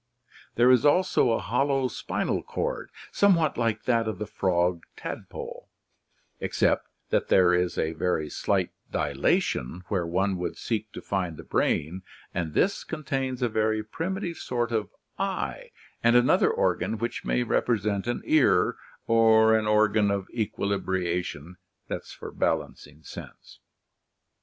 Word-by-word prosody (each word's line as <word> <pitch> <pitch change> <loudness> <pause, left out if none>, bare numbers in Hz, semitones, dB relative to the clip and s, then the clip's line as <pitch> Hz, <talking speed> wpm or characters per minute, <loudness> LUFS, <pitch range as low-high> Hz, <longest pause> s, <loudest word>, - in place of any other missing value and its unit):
Ther6 125 +2 +6
is 125 - +4
also 150 -2 +3
a 115 - +2
hollow 135 +7 +1
spinal 125 - -2
cord, - - -3 0.2
somewhat 170 -7 +3
like 115 -2 0
that 115 -2 +1
of 110 - -3
the 105 - -4
frog 90 -4 0 0.2
tadpole, - - -7 0.7
except - - +1 0.2
that - - +1
there 90 -1 +5
is 90 0 +1
a 80 - 0
very 80 -2 -1
slight - - 0 0.2
dilatation 85 +9 0
where 90 -5 0
one 95 +3 0
would 90 - -4
seek 110 -2 -3
to - - -8
find 90 -5 -2
the - - -9
brain 85 +6 0 0.3
and 80 -3 -3
this 195 - +2
contains 135 -5 -3
a - - +3
very 110 -1 0
primitive 170 - -4
sort 120 -2 -2
of 110 -3 -1 0.3
eye - - -3 0.3
and 120 +1 +4
another 120 +1 +5
organ 105 +5 0
which 115 +2 -3
may 125 - +1
represent 105 -3 0
an 120 - -2
ear 155 -4 +3 0.3
or 110 -1 +5
an 110 -1 +1
organ 105 -1 +3
of 100 -1 -1
equilibration 90 -6 -2 0.3
(balancing 75 +2 -4
sense). - - -11
110 Hz, 135 wpm, -27 LUFS, 90-120 Hz, 0.7 s, Ther6